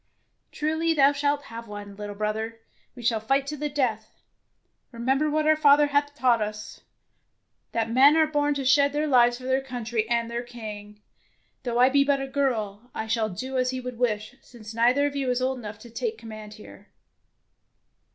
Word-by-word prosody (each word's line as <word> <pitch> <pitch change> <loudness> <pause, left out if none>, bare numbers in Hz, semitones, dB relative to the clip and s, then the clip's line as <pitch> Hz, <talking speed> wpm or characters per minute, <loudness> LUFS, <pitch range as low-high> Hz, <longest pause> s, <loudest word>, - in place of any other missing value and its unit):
"Truly 320 +2 0
thou 280 -1 +5
shalt 285 0 0
have 230 -2 -9
one, 205 -1 -8
little 205 0 -7
brother. 220 +2 -3 0.4
We 245 - -10
shall 230 -1 +2
fight 270 +5 +1
to 300 +2 -4
the 300 0 -3
death. 240 -7 -2 0.7
Remember 265 +5 0
what 305 +1 0
our 310 0 +5
father 295 -1 +5
hath 290 0 +1
taught 250 -5 +2
us, 210 0 -5 0.9
that 225 -1 -1
men 275 +6 +6
are 320 - +5
born 290 -1 0
to 275 -1 -3
shed 280 +2 +4
their 300 +1 0
lives 245 -4 +4
for 255 - -13
their 260 +1 +1
country 235 -4 -3
and 235 -1 +1
their 235 +1 -3
king. 210 -3 -9 0.6
Though 240 -2 -2
I 250 +1 +6
be 280 +1 +4
but 280 0 +1
a 270 - -4
girl, 245 -5 -2
I 220 - -3
shall 220 -1 0
do 255 +8 -4
as 255 0 +1
he 260 0 -3
would 250 -2 -7
wish, 215 -2 -1
since 225 -2 -12
neither 245 +5 +3
of 285 -1 -2
you 270 -2 -1
is 250 0 +1
old 260 0 -1
enough 210 -2 -8
to 230 +2 -14
take 450 - -3
command 215 -1 -10
here." 205 -2 -14
250 Hz, 190 wpm, -26 LUFS, 220-280 Hz, 0.9 s, men